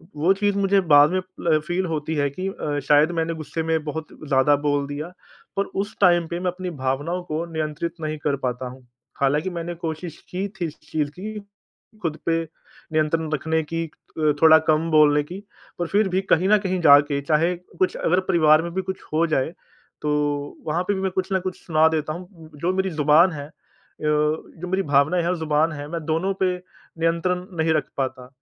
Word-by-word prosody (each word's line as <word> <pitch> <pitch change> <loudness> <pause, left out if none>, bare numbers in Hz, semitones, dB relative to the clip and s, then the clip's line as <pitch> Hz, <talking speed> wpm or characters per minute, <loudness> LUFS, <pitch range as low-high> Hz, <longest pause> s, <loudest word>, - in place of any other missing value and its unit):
वो 165 +6 +3
चीज़ 200 0 0
मुझे 200 0 +3
बाद 145 -3 +6
में 185 - +1
अ, 180 -4 0
फ़ील 180 +2 0
होती 160 -1 -2
है 145 -1 +1
कि 185 +7 -5
अ, 145 -6 -3
शायद 150 +3 +5
मैंने 165 +1 -1
गुस्से 160 +1 -4
में 160 -1 0
बहुत 155 +1 -5 0.2
ज़्यादा 140 +1 +4
बोल 145 -1 +1
दिया, 145 +3 -5 0.5
पर 200 - +3 0.2
उस 205 +2 -6
टाइम 175 -3 +5
पे 170 +1 -4
मैं 180 -1 0
अपनी 180 0 -5
भावनाओं 145 +7 -1
को 160 0 -3
नियंत्रित 155 +1 -3
नहीं 155 0 -3
कर 145 -2 +1
पाता 125 +1 -2
हूँ। 125 -1 -14 0.3
हालाँकि 150 +6 +2
मैंने 170 0 -4
कोशिश 165 0 -5
की 190 +3 -2
थी 170 - 0
इस 155 - -7
चीज़ 150 -2 0
की 215 +1 -5 0.6
खुद 160 -3 -2
पे 165 0 +2 0.5
नियंत्रण 155 0 +1
रखने 160 +2 0
की 165 +2 -3
अ, 155 0 -2
थोड़ा 160 0 +9
कम 160 +1 +2
बोलने 150 -1 +5
की, 180 +6 -8 0.4
पर 175 - -1
फिर 205 +2 +2
भी 185 +1 +1
कहीं 185 +4 +4
न 215 - +6
कहीं 185 -2 -1
जाके, 145 -1 +6
चाहे 160 +5 +2 0.2
कुछ 185 - +2
अगर 180 +3 +2
परिवार 155 -2 +5
में 170 - -4
भी 190 - 0
कुछ 190 0 -5
हो 165 +2 +3
जाए, 155 +1 0 0.5
तो 145 -1 -1
वहाँ 170 +4 0
पे 205 - +2
भी 190 - -3
मैं 190 -1 0
कुछ 190 +1 -2
न 190 - +3
कुछ 185 -1 -4
सुना 160 -1 +4
देता 155 -1 -1
हूँ। 175 -2 -11
जो 180 +3 0
मेरी 190 0 0
ज़ुबान 155 +3 +4
है 145 -2 -6
अ, - - -20 0.5
जो 150 +3 -1
मेरी 190 +2 0
भावनाएँ 145 +4 +3
हैं 170 - 0
और 180 - 0
ज़ुबान 155 +1 +1
है, 145 0 -6
मैं 165 0 -5
दोनों 165 +5 0
पे 180 -1 +2 0.4
नियंत्रण 180 +2 0
नहीं 160 0 +2
रख 150 -3 -1
पाता। 130 -2 -3
160 Hz, 205 wpm, -23 LUFS, 150-180 Hz, 0.6 s, थोड़ा